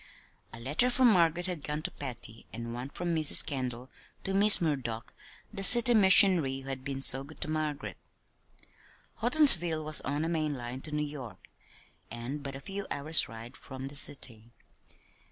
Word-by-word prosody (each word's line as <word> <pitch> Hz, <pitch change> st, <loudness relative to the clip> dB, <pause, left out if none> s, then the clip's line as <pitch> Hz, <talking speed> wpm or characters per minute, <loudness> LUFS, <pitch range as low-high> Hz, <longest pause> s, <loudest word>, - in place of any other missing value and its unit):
A 115 Hz, -, -10 dB
letter 145 Hz, -, 0 dB
from 250 Hz, -1 st, +2 dB
Margaret 175 Hz, -2 st, 0 dB
had 180 Hz, -5 st, -6 dB
gone 150 Hz, +1 st, -6 dB
to -, -, -4 dB
Patty, 120 Hz, -4 st, -4 dB
and 115 Hz, +1 st, -9 dB
one 125 Hz, +3 st, -8 dB
from 175 Hz, +3 st, -6 dB
Mrs. 155 Hz, -2 st, +5 dB
Kendall 130 Hz, -3 st, -7 dB, 0.4 s
to 195 Hz, -, -6 dB
Miss 205 Hz, +2 st, +7 dB
Murdock, 130 Hz, -8 st, -5 dB, 0.4 s
the 195 Hz, -, -7 dB
city 240 Hz, +4 st, +5 dB
missionary 185 Hz, -, +4 dB
who 135 Hz, -, -12 dB
had 130 Hz, -1 st, -7 dB
been 135 Hz, -1 st, -4 dB
so 135 Hz, 0 st, +5 dB
good 150 Hz, +3 st, -16 dB
to -, -, -3 dB
Margaret. 155 Hz, -2 st, -6 dB, 1.2 s
Houghtonsville 215 Hz, -, +3 dB
was 155 Hz, 0 st, +1 dB
on 145 Hz, +3 st, -5 dB
a -, -, -4 dB
main 155 Hz, -3 st, -4 dB
line 125 Hz, +1 st, -9 dB
to 155 Hz, -, -12 dB
New 150 Hz, 0 st, -4 dB
York, 140 Hz, -6 st, -12 dB, 0.6 s
and 120 Hz, +5 st, -8 dB
but 140 Hz, -1 st, -9 dB
a -, -, -9 dB
few 195 Hz, +7 st, -9 dB
hours' 155 Hz, +3 st, +1 dB
ride 115 Hz, +3 st, -13 dB
from 135 Hz, 0 st, -11 dB
the 145 Hz, -, -15 dB
city. 120 Hz, -6 st, 0 dB
145 Hz, 170 wpm, -27 LUFS, 130-170 Hz, 1.2 s, Miss